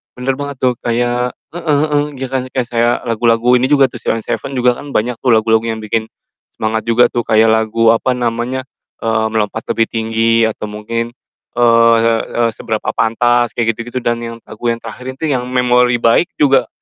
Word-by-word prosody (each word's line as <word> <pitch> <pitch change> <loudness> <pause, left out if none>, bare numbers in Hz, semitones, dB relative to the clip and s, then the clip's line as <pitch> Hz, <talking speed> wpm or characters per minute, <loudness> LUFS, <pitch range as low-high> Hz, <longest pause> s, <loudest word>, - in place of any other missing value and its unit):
Bener 130 +2 -1
banget 140 -2 -6
tuh, 125 -2 +1
kayak 120 +1 -1 0.2
heeh 170 -1 -8 0.2
heeh, 145 -1 +1
iya 130 0 -4
kan, 130 -1 -2
kayak 130 -2 -3
saya 120 0 +2
lagu-lagu 115 +1 +2
ini 130 - +1
juga 140 -3 +3
tuh 120 - -9
Sheila 115 - -1
On 115 - -5
7 135 - -4
juga 125 -1 +2
kan 145 -1 -9
banyak 115 +2 0
tuh 120 -3 +3
lagu-lagu 110 0 +2
yang 110 -1 -4
bikin 110 +1 -1 0.5
semangat 110 +1 -2
juga 120 +1 +4
tuh 120 - -1
kayak 110 0 +4
lagu, 110 +1 +1
apa 115 +3 +1
namanya, 120 +2 -2 0.4
eee, 110 -1 0
Melompat 110 0 -2
Lebih 115 -1 +1
Tinggi 115 0 0
atau 110 -1 -2
mungkin, 115 +3 -4 0.4
eee, 115 -1 +4
e 120 - -2
Seberapa 110 -2 -3
Pantas 120 +1 +1
kayak 115 -1 +1
gitu-gitu 120 +3 -5
dan 120 -1 0
yang 115 0 -6
lagu 120 - -6
yang - - -1
terakhir 125 +2 -9
itu 155 +1 -2
yang 125 -1 -1
Memori 125 -1 +2
Baik 115 +9 +3
juga, 135 -5 +3
120 Hz, 190 wpm, -16 LUFS, 115-125 Hz, 0.5 s, juga